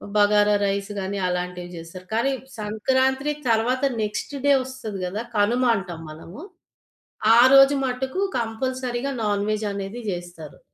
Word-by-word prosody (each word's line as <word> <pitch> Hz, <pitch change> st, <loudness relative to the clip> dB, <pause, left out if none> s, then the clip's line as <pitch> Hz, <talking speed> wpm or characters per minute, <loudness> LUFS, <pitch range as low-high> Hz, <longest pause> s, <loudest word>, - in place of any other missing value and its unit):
Bagara 205 Hz, 0 st, +4 dB
rice 200 Hz, +1 st, -2 dB
గాని 195 Hz, +1 st, -3 dB
అలాంటివి 180 Hz, 0 st, -3 dB
జేస్తారు. 165 Hz, +3 st, -10 dB
కానీ 250 Hz, +5 st, +2 dB, 0.3 s
సంక్రాంత్రీ 260 Hz, +7 st, +1 dB, 0.2 s
తర్వాత 240 Hz, +4 st, +1 dB, 0.2 s
నెక్స్ట్ 210 Hz, +7 st, -3 dB
డే 285 Hz, -, +6 dB
ఒస్తది 255 Hz, -6 st, -7 dB
గదా! 200 Hz, +5 st, -3 dB, 0.2 s
కనుమ 235 Hz, +5 st, +2 dB
అంటాం 180 Hz, -4 st, -6 dB
మనము. 165 Hz, -, -11 dB, 1.0 s
ఆ -, -, +7 dB, 0.2 s
రోజు 270 Hz, +1 st, +8 dB
మట్టుకు 260 Hz, +7 st, -2 dB, 0.2 s
కంపల్సరీగా 250 Hz, +3 st, -2 dB
నాన్వెజనేది 205 Hz, +1 st, -2 dB
జేస్తారు. 175 Hz, -4 st, -8 dB
210 Hz, 115 wpm, -23 LUFS, 195-255 Hz, 1.0 s, రోజు